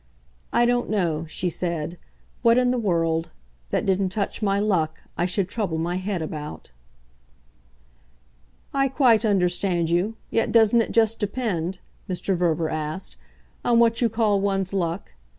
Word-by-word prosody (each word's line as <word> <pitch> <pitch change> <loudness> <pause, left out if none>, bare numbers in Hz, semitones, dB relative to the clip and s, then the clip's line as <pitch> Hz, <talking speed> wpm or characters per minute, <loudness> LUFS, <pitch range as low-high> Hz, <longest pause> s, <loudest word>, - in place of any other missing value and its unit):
I 240 +1 +3
don't 245 0 +1
know," 170 -6 0
she 180 - -2
said, 170 -1 -3 0.4
"what 230 0 +5
in 250 0 +3
the 250 - 0
world 165 -5 0 0.4
that - - 0
didn't 190 0 +1
touch 200 +3 -3
my 200 -1 +1
luck 175 -7 0
I 175 - 0
should 185 0 0
trouble 195 -7 -2
my 175 +2 -1
head 185 -2 -2
about." 150 - -7 2.0
"I 275 0 +2
quite 250 -5 +4
understand 180 -4 +2
you 185 +6 +1 0.2
yet 225 - +1
doesn't 230 0 +5
it - - -3
just 225 -1 +2
depend," 195 -5 -2 0.3
Mr. 185 +1 -1
Verver 170 -2 0
asked, 155 +3 -4 0.5
"on 240 -1 +3
what 230 0 +3
you 235 - +3
call 215 -3 +1
one's 195 -1 0
luck? 175 -1 -2
195 Hz, 150 wpm, -24 LUFS, 170-225 Hz, 2.0 s, what